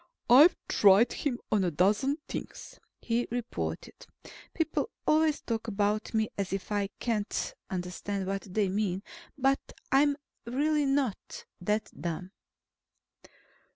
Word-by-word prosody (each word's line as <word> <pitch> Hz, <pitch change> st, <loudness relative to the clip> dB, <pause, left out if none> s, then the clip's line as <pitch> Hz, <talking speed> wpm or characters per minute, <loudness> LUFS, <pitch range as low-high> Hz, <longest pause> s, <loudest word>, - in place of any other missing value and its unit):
"I've 300 Hz, +8 st, +8 dB
tried 205 Hz, +3 st, +5 dB
him 255 Hz, -4 st, -2 dB
on 210 Hz, -3 st, +3 dB
a 180 Hz, -, +2 dB
dozen 205 Hz, -, +2 dB
things," -, -, -7 dB, 0.2 s
he 235 Hz, +1 st, 0 dB
reported. 240 Hz, 0 st, -5 dB, 0.4 s
People 325 Hz, +6 st, -1 dB, 0.2 s
always 310 Hz, -1 st, +3 dB
talk 230 Hz, -1 st, -3 dB
about 210 Hz, +1 st, 0 dB
me 220 Hz, -1 st, +1 dB
as 195 Hz, -2 st, -2 dB
if 195 Hz, +1 st, -4 dB
I 200 Hz, -1 st, 0 dB
can't 220 Hz, -4 st, -1 dB, 0.2 s
understand 185 Hz, +2 st, -3 dB
what 195 Hz, 0 st, -4 dB
they 205 Hz, +1 st, +1 dB
mean. 195 Hz, -1 st, -1 dB, 0.3 s
But 270 Hz, 0 st, +3 dB, 0.3 s
I'm 280 Hz, +1 st, +4 dB, 0.3 s
really 290 Hz, +4 st, +1 dB
not 270 Hz, -7 st, -1 dB
that 210 Hz, +4 st, -1 dB
dumb. 175 Hz, +2 st, -5 dB
215 Hz, 120 wpm, -29 LUFS, 195-270 Hz, 0.4 s, I've